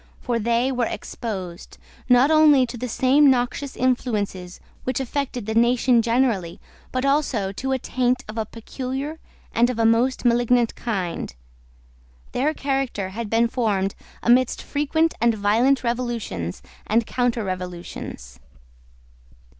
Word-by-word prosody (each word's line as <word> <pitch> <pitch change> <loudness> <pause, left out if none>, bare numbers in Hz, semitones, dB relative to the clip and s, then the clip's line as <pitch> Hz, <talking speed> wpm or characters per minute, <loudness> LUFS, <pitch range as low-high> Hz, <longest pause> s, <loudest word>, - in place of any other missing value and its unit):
For 240 -2 -1
they 235 +4 +1
were 245 -2 0
exposed, 185 -7 -6 0.3
not 250 +4 +5
only 300 -4 +6
to 240 0 -8
the 245 +1 -4
same 275 +5 +4
noxious 260 +2 0
influences 210 -8 -1 0.2
which 255 0 -1
affected 265 -3 -3
the 220 - -2
nation 240 +1 +4
generally, 230 -7 0 0.3
but 255 +1 -1
also 270 -9 +1
to 265 +7 -4
a 265 - +2
taint 250 0 0
of 215 - -7
a 220 -2 -2
peculiar 265 +7 -5 0.3
and 240 +2 +3
of 250 - -3
a 225 - +2
most 240 +4 +2
malignant 240 0 +3
kind. 185 - -4 1.0
Their 300 +5 0
character 270 -9 -2
had 220 +2 -5
been 230 +2 +3
formed 205 -5 0 0.3
amidst 245 +1 +3
frequent 315 +3 0
and 235 -1 +3
violent 230 +7 +2
revolutions 235 - -3 0.2
and 225 +1 +2
counterrevolutions. 180 - -4
240 Hz, 130 wpm, -23 LUFS, 215-260 Hz, 1.0 s, only